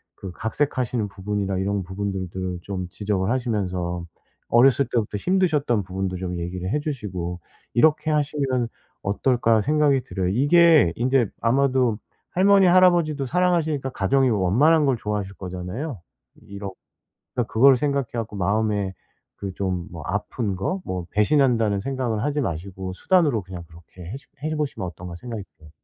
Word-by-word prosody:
그 95 - -8
각색하시는 115 - -1
부분이나 100 -1 -3
이런 100 0 -1
부분들도 95 -1 -4
좀 95 -1 -4
지적을 100 0 -1
하시면서 95 -8 -1 0.4
어렸을 130 +3 +5
때부터 110 -3 0
힘드셨던 150 - +1
부분도 95 0 -3
좀 90 -1 -4
얘기를 90 +2 -4
해 150 - +1
주시고 95 - -4 0.3
이렇게 155 +4 +3
하시면 140 -5 0 0.3
어떨까?' 115 +2 +2
생각이 145 0 +2
들어요. 95 -2 -2
이게 145 - +5
인제 125 -1 +2
아마도 125 -2 +2 0.3
할머니, 195 +1 +5
할아버지도 175 -5 +4
사랑하시니까 160 -3 +1
가정이 130 +6 +2
원만한 125 - +3
걸 135 -2 +3
좋아하실 105 -2 -3
거잖아요. 95 - -5 0.4
이렇 100 -1 -7 0.6
그러니까 120 -3 -2
그걸 130 +4 +7
생각해 140 -2 0
갖고 115 -3 -4
마음에 100 0 0 0.4
그 100 -1 -5
좀 95 -2 -2
뭐 85 -2 -7
좀 90 - -3
아픈 105 0 -2
거 140 - -2
뭐 90 -1 -4
배신한다는 115 -3 +2
생각은 125 -3 -2
하지 145 +4 0
마시고 95 +1 -4
'수단으로 150 - +2
그냥 90 -2 -8
그렇게 85 +2 -15
해 - - -4
주 - - -26
해 155 +1 -1
보시면 145 -11 -2
어떤가.' 85 0 -8
생각이 115 +2 -6 0.2
들어요. 80 -1 -16
110 Hz, 365 characters per minute, -23 LUFS, 95-140 Hz, 0.6 s, 그걸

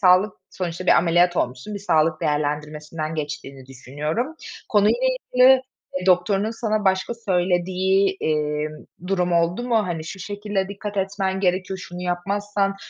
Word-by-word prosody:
sağlık, 185 +1 +5 0.2
sonuçta 180 0 -4
bir - - +5
ameliyat 175 +1 +3
olmuşsun, 125 +11 -2
bir 200 - -3
sağlık 160 -4 +2
değerlendirmesinden 150 +1 -2
geçtiğini 140 -3 -6
düşünüyorum. 150 - -4 0.3
Konuyla 210 - +3 0.3
ilgili 255 +1 +7 0.4
doktorunun 195 +3 +3
sana 215 -2 -1
başka 190 +4 +1
söylediği, 190 -1 +1
eee, 150 -1 0 0.4
durum 180 -2 0
oldu 170 +5 +2
mu? 235 - +3
Hani, 165 -3 -3
şu 190 - -7
şekilde 205 0 -3
dikkat 205 +1 -6
etmen 195 0 -1
gerekiyor, 185 0 0
şunu 180 0 -8
yapmazsan, 195 +2 -1
185 Hz, 130 wpm, -23 LUFS, 160-200 Hz, 0.4 s, ilgili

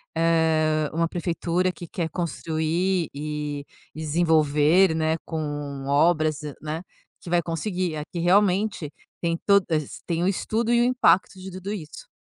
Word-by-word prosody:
eh, 160 -2 +2
uma 165 +1 +1
prefeitura 175 +1 -1
que 175 -1 -10
quer 165 -1 -3
construir 170 +1 -1
e 150 0 -4 0.3
desenvolver, 160 +2 +3
né, 160 0 +1
com 145 -3 -4
obras, 155 +1 +3 0.2
né, 155 +2 -4 0.4
que - - -9
vai 175 0 +3
conseguir. 175 +1 -2
Aqui 150 +3 -6
realmente 185 -2 +2 0.3
tem 170 -1 0
to 200 -1 +5
es 155 -3 -2
tem 170 -1 -1
o - - +2
estudo 220 +4 0
e 235 - +4
o - - +4
impacto 190 -7 +3
de 190 +1 -8
tudo 190 +2 -6
isso. 170 - -8
165 Hz, 145 wpm, -25 LUFS, 155-180 Hz, 0.4 s, to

